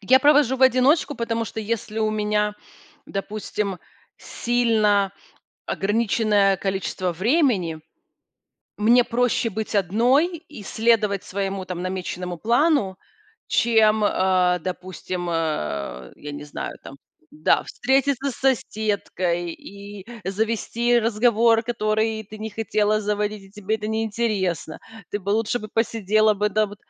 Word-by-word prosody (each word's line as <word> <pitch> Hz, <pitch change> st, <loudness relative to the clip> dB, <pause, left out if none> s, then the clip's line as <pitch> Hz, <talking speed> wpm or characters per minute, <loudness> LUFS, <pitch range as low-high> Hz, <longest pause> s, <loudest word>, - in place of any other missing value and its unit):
Я 255 Hz, +6 st, +5 dB
провожу 285 Hz, -2 st, +4 dB
в 265 Hz, -, -1 dB
одиночку, 260 Hz, +4 st, +4 dB
потому 230 Hz, -2 st, -2 dB
что, 220 Hz, -, -6 dB
если 220 Hz, 0 st, -3 dB
у 215 Hz, -1 st, +1 dB
меня, 210 Hz, -1 st, 0 dB, 0.5 s
допустим, 200 Hz, -1 st, -4 dB, 0.4 s
сильно 215 Hz, -5 st, +1 dB, 0.5 s
ограниченное 205 Hz, -1 st, +2 dB
количество 190 Hz, -1 st, -2 dB
времени, 195 Hz, -, +1 dB, 1.0 s
мне 235 Hz, +4 st, +5 dB
проще 245 Hz, 0 st, +1 dB
быть 220 Hz, +2 st, -4 dB
одной 245 Hz, -, +2 dB
и 300 Hz, -9 st, -12 dB
следовать 215 Hz, -2 st, +1 dB
своему 195 Hz, 0 st, -3 dB
там 180 Hz, -1 st, -5 dB
намеченному 180 Hz, -1 st, -4 dB
плану, 235 Hz, -, +2 dB, 0.5 s
чем, 220 Hz, -2 st, +3 dB
э, 185 Hz, -2 st, +2 dB
допустим, 180 Hz, 0 st, -5 dB
э, 75 Hz, -, -3 dB
я 145 Hz, 0 st, -8 dB
не 145 Hz, 0 st, -7 dB
знаю 150 Hz, -, -6 dB
там, 135 Hz, -, -11 dB, 0.3 s
да, 155 Hz, +1 st, +2 dB
встретиться 275 Hz, +1 st, 0 dB
с -, -, -9 dB
соседкой 200 Hz, -8 st, -1 dB
и 200 Hz, +1 st, -11 dB, 0.2 s
завести 230 Hz, +3 st, +1 dB
разговор, 230 Hz, 0 st, +3 dB
который 220 Hz, -1 st, -1 dB
ты 215 Hz, +1 st, -11 dB
не 220 Hz, +1 st, -5 dB
хотела 215 Hz, 0 st, 0 dB
заводить 210 Hz, 0 st, -2 dB
и 195 Hz, -, -17 dB
тебе 210 Hz, +1 st, -2 dB
это 215 Hz, 0 st, -5 dB
неинтересно. 215 Hz, -7 st, -1 dB, 0.3 s
Ты 205 Hz, -, -3 dB
бы 200 Hz, -, -4 dB
лучше 225 Hz, +3 st, +1 dB
бы 215 Hz, -1 st, -8 dB
посидела 215 Hz, -1 st, +2 dB
бы, 210 Hz, +1 st, 0 dB
да, 215 Hz, +1 st, +1 dB
б 205 Hz, 0 st, -11 dB
215 Hz, 125 wpm, -23 LUFS, 195-230 Hz, 1.0 s, Я